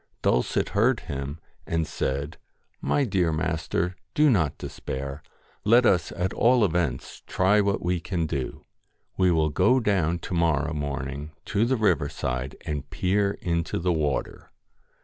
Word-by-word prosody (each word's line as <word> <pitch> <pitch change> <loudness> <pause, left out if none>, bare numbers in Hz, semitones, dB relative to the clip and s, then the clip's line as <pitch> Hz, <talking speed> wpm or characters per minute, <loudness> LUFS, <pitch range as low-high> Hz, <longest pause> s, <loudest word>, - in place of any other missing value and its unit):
Dulcet - - +1
heard 115 +4 +2
him, 70 +3 -5 0.3
and 80 -1 0
said 70 +3 -3 0.2
' - - -44
My 145 - +3
dear 95 -8 +1
master, 80 +3 -1 0.2
do 150 -1 +5
not 85 - +1
despair. 70 +2 -6 0.4
Let 120 +4 +5
us 90 -5 +3
at 90 +1 -2
all 120 -1 +4
events 80 -8 -2
try 100 +3 +3
what 100 -1 0
we 90 0 0
can 85 -1 -2
do. 70 -6 -4 0.5
We 95 -1 +3
will 80 -2 +2
go 125 - +3
down 95 -7 +1
to 85 - -7
morrow 80 -2 +1
morning 70 0 -4 0.2
to 105 +2 +3
the 130 +2 +1
river 90 -10 +2
side 65 +1 -3
and 75 -2 -4
peer 100 +2 +1
into 85 -1 -1
the 90 +1 +1
water.' 75 -3 -2
85 Hz, 150 wpm, -26 LUFS, 75-100 Hz, 0.5 s, do